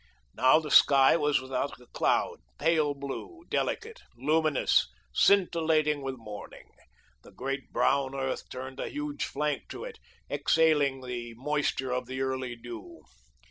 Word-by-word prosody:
Now 130 +4 +5
the 155 -2 -3
sky 135 0 +7
was 150 -4 +2
without 130 +1 -3
a 125 - -17
cloud, - - +1 0.2
pale 155 -3 +2
blue, 140 - -7
delicate, 455 +2 -2 0.2
luminous, 155 - +2 0.3
scintillating 160 - +3
with 135 -1 -4
morning. 105 -4 -10 0.5
The - - -16
great 135 +1 -5
brown 140 -1 +1
earth 135 -1 -3
turned 130 +1 -7
a - - -3
huge 145 0 -3
flank 150 -1 -2
to - - -7
it, 475 -2 -8 0.3
exhaling 150 -5 +2
the 120 -2 -6
moisture 135 0 -1
of 125 -1 -2
the 130 +1 -4
early 130 -2 -2
dew. 115 -7 -10
140 Hz, 140 wpm, -29 LUFS, 130-155 Hz, 0.5 s, sky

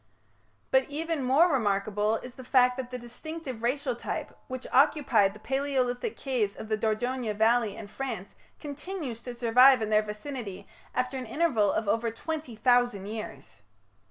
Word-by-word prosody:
But 265 0 +3
even 320 +1 -2
more 285 +7 +4
remarkable 210 -2 +1
is 250 +2 -7
the 260 - -11
fact 250 -1 +4
that 255 -2 -4
the 250 - -5
distinctive 255 +1 -7
racial 280 - 0
type - - -5
which 255 -1 -6
occupied 255 -8 +4
the - - -12
Palaeolithic 265 - -1
caves 240 -7 -1
of 220 - -8
the 215 - +2
Dordogne 225 +2 -1
valley 225 -1 +3
in 215 - -8
France 220 -4 -5 0.3
continues 290 - -6
to 245 0 -7
survive 250 +3 +6
in 220 -1 -2
their 215 0 +5
vicinity 210 -1 -6 0.3
after 255 +1 -1
an 255 -2 -5
interval 230 -7 +2
of 220 - -1
over 230 +3 +1
twenty 300 +2 -5
thousand 245 -3 +2
years. 210 - -8
245 Hz, 155 wpm, -28 LUFS, 220-270 Hz, 0.3 s, survive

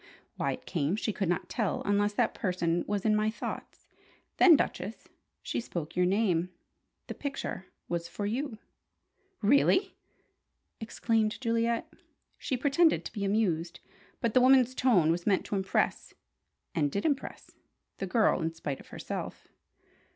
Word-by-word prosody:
Why - - -1
it - - -10
came, 160 +1 0
she 215 0 -2
could 195 -4 -1
not 175 - -1
tell 220 -5 -1
unless 205 +1 +2
that 230 +1 +1
person 175 -3 0
was 205 0 -2
in 215 -1 +4
my 215 0 +2
thoughts. 220 - -7 0.5
Then, 345 -4 +8
Duchess, - - -3 0.4
she - - -2
spoke 165 -7 -6
your 180 0 +3
name. 185 -3 +1 0.6
The - - -6
picture 275 -9 -5 0.2
was 170 -1 -2
for 205 - -5
you." 235 +3 -2 0.9
"Really!" 325 - +4 0.9
exclaimed 225 -1 0
Juliet. 230 -1 0 0.5
She 260 - -2
pretended 300 +5 +3
to - - -7
be 205 - -3
amused; 185 -5 0 0.4
but 230 -2 0
the 255 - +5
woman's 255 -1 +5
tone 210 -12 +3
was 170 +3 -2
meant 195 -3 +2
to - - -3
impress, 190 -1 -1 0.6
and 145 -4 +1
did 200 - -2
impress, 285 -3 -2 0.5
the 195 - -3
girl 215 -2 +2
in 160 0 -1
spite 145 -4 -4
of - - -14
herself. - - -6
210 Hz, 150 wpm, -29 LUFS, 180-235 Hz, 0.9 s, Then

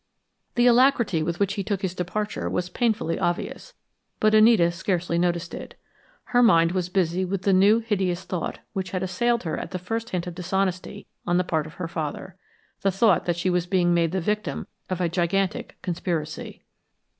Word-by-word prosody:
The 240 -1 +4
alacrity 245 - +4
with 170 +2 -2
which 200 -1 +1
he 200 - -3
took 200 0 -2
his 185 -2 -1
departure 205 +4 -3
was 180 0 -2
painfully 220 -6 0
obvious, 180 - -3 0.4
but 215 0 +3
Anita 215 -6 +6
scarcely 170 -1 -1
noticed 175 0 -1
it. - - -8 0.5
Her 245 - +2
mind 170 -8 +5
was 180 -1 -1
busy 180 -1 +1
with 190 0 -3
the 195 - +3
new, 200 +4 +6
hideous 190 -5 -1
thought, 180 -3 -4 0.2
which 190 -2 -3
had 185 -1 -2
assailed 235 +6 0
her 160 - -2
at - - -6
that 185 - -4
first 225 +6 -4
hint 180 -1 -2
of 180 - -5
dishonesty 185 +1 -2 0.2
on 175 0 +2
the 180 - +2
part 160 -3 -1
of 155 - -13
her 180 - -4
father 165 +2 -5 0.5
the 195 - +2
thought 195 0 +3
that 175 -1 0
she 180 +2 0
was 180 0 0
being 175 -2 +2
made 170 -2 +2
the 190 - 0
victim 210 +4 -2 0.2
of 185 -1 -2
a 175 - +2
gigantic 180 +3 -1
conspiracy. 170 -3 -4
185 Hz, 190 wpm, -25 LUFS, 175-200 Hz, 0.5 s, Anita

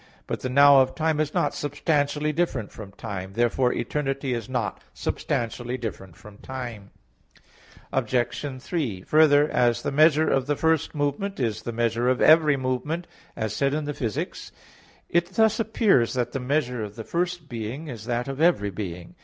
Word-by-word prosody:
But - - -3
the 130 - -3
"now" 140 +1 +7
of 130 0 0
time 160 -1 0
is 155 -1 0
not - - 0
substantially 145 +1 0
different 140 - -1
from 105 -3 -10
time. 95 -3 -6
Therefore 120 +3 +2
eternity 135 +1 -2
is 115 -2 -4
not 120 -5 -2
substantially 120 +2 -2
different 95 -7 -7
from 105 +2 -15
time. 120 -6 -7 1.0
Obj. 130 +2 -1
3: 130 - -2
Further, 150 +1 +5
as 120 -3 +1
the - - -1
measure 155 +2 +4
of 135 -1 +1
the 145 - +1
first 160 +1 +1
movement 145 +7 -2
is 115 -5 -1
the 120 - -4
measure 120 +1 0
of 130 - +1
every 155 -2 +6
movement, 130 +6 -2 0.3
as 110 -2 -3
said 140 +1 +1
in 155 -1 -2
Phys. 125 -7 -3
iv, - - -5 0.6
it 170 0 +1
thus 220 0 +3
appears 215 - +2
that 120 -1 -1
the 135 - -3
measure 125 -2 -1
of 105 -1 -7
the 115 - -6
first 175 +2 -2
being 120 +5 -5
is 115 -6 -7
that 120 +1 -2
of 135 +2 -4
every 130 - +3
being. 90 -3 -6
130 Hz, 170 wpm, -25 LUFS, 115-150 Hz, 1.0 s, now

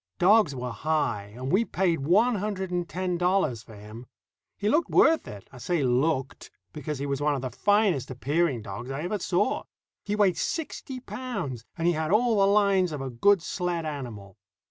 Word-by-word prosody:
Dogs 190 -5 +4
were 125 -1 -4
high, 115 -6 -1
and 130 +2 -4
we 195 +6 +4
paid 180 -6 0
one 200 - +3
hundred 190 -2 -3
and 175 -1 -2
ten 180 -1 -2
dollars 180 - +1
for 115 -3 -14
him. 105 +4 -11 0.5
He 205 - -2
looked 310 +10 +2
worth 320 0 +4
it. 105 -2 -10
I 130 - -12
say 170 +3 0
looked, 135 +2 0 0.2
because 150 -1 -4
he 140 - -4
was 140 0 -2
one 150 0 +2
of 135 - -4
the 130 - -3
finest 200 - +2
appearing 135 0 0
dogs 105 +6 -7
I 135 +3 -4
ever 200 +4 -2
saw. 190 +7 0 0.4
He 205 - -2
weighed 200 -5 +3
sixty 285 -4 -4
pounds, 200 - -5
and 165 - -2
he 175 - +4
had 155 -1 -2
all 225 +1 +3
the 195 - +5
lines 200 -3 +3
of 150 - -4
a 135 -1 -4
good 180 +10 +3
sled 175 -3 -2
animal. 120 -10 -7
165 Hz, 190 wpm, -27 LUFS, 130-200 Hz, 0.5 s, the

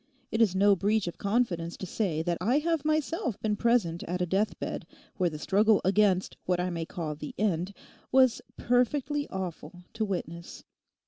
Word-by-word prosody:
It 225 - +1
is 200 -5 +4
no 200 +1 +5
breach 205 +3 +1
of 175 - -6
confidence 200 -6 0
to - - -5
say 175 -5 -1
that 170 0 -1
I 235 +9 +3
have 325 -1 0
myself 310 - -1
been 215 -1 0
present 210 -8 +1
at 180 +1 -3
a 180 - +1
death 195 +5 0
bed - - -5 0.3
where 180 -2 +2
the 155 - -6
struggle 210 +6 +3
against 195 -1 +2
what 180 -1 +1
I 180 +1 -1
may 165 -1 -3
call 160 -3 -4
the 150 0 -8
end 185 -3 0 0.4
was 260 -2 +4 0.2
perfectly 275 +4 +1
awful 180 -2 -6
to 225 - -1
witness. 170 -4 -5
195 Hz, 180 wpm, -29 LUFS, 175-230 Hz, 0.4 s, no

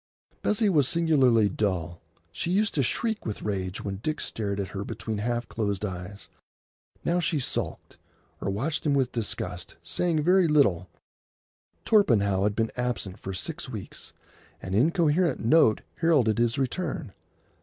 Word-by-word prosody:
Bessie 210 +1 +2
was 150 -9 +3
singularly 135 -10 +4
dull. 90 -4 -2 0.3
She 90 - -3
used 210 +4 +2
to 145 - +1
shriek 220 - -1
with 110 - -5
rage 95 -2 -3
when 100 -1 -3
Dick 155 +9 -3
stared 100 -2 -3
at 95 - -3
her 100 0 -4
between 110 +1 -4
half 120 +2 -1
closed 100 -2 -2
eyes. 95 +1 -7 0.8
Now 175 +1 +2
she 165 -3 0
sulked, 130 - -4 0.4
or - - -1
watched 135 +11 -2
him 145 -2 +2
with 130 -3 +1
disgust, 95 -6 -4
saying 155 - 0
very 180 +1 +4
little. 150 -2 +3 1.0
Torpenhow 100 - +3
had 105 -1 0
been 115 0 0
absent 120 -6 -3
for 95 0 -5
six 155 - -5
weeks. 110 -6 -8 0.5
An 95 - -6
incoherent 160 - +2
note 115 -2 +4 0.2
heralded 135 -10 +3
his 120 +2 +2
return. 135 - -2
120 Hz, 145 wpm, -27 LUFS, 100-160 Hz, 1.0 s, singularly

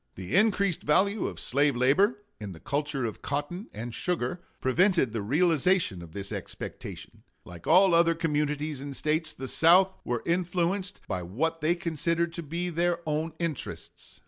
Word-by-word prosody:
The 95 - -4
increased 200 -3 +2
value 195 +8 +2
of - - -7
slave 140 +1 +1
labor, 195 - +3 0.2
in 105 -3 -6
the 80 - -12
culture 145 - -2
of 110 - -5
cotton 145 - -3
and 115 +2 -6
sugar, 175 +1 -2 0.2
prevented 165 - +2
the 115 - -2
realization 160 - +2
of 85 -2 -11
this 100 -1 -5
expectation. - - -7 0.2
Like 85 -2 -11
all 185 +2 +6
other 170 0 +4
communities 150 -3 -1
and 140 -1 -6
States, 155 +2 0
the 135 -3 -7
South 180 +7 +5
were 120 -1 -2
influenced 180 +3 -1
by 90 - -2
what 155 - -2
they 160 +3 +2
considered 170 0 -1
to 170 - -4
be 170 +3 -3
their 170 +1 +1
own 155 +1 -1
interests. 165 -5 -6
160 Hz, 160 wpm, -28 LUFS, 135-175 Hz, 0.2 s, all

